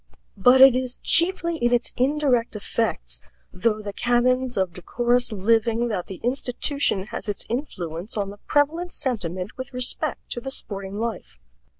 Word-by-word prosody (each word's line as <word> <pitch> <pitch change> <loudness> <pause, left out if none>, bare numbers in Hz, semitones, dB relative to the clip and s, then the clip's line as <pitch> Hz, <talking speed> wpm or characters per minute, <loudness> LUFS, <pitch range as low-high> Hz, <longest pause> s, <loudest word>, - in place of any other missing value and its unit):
But 250 +6 +5
it 265 -2 +9
is 255 -1 0
chiefly 340 -1 +2
in 240 -4 +1
its 245 0 +1
indirect 255 -4 +1
effects, - - -2 0.3
though 215 +2 0
the 205 -1 -5
canons 250 +1 +1
of 190 -3 0
decorous 240 +7 +1
living, 225 +3 +1
that 185 -5 -3
the 190 - -8
institution 250 -3 0
has - - -5
its 205 - -1
influence 190 - -4
on 200 -1 -2
the 205 - -12
prevalent 325 +5 +1
sentiment 185 -7 -3
with 260 0 -7
respect 250 0 0
to 240 - -3
the 270 - -5
sporting 200 -6 -4
life. 220 - -5
240 Hz, 155 wpm, -24 LUFS, 200-255 Hz, 0.3 s, it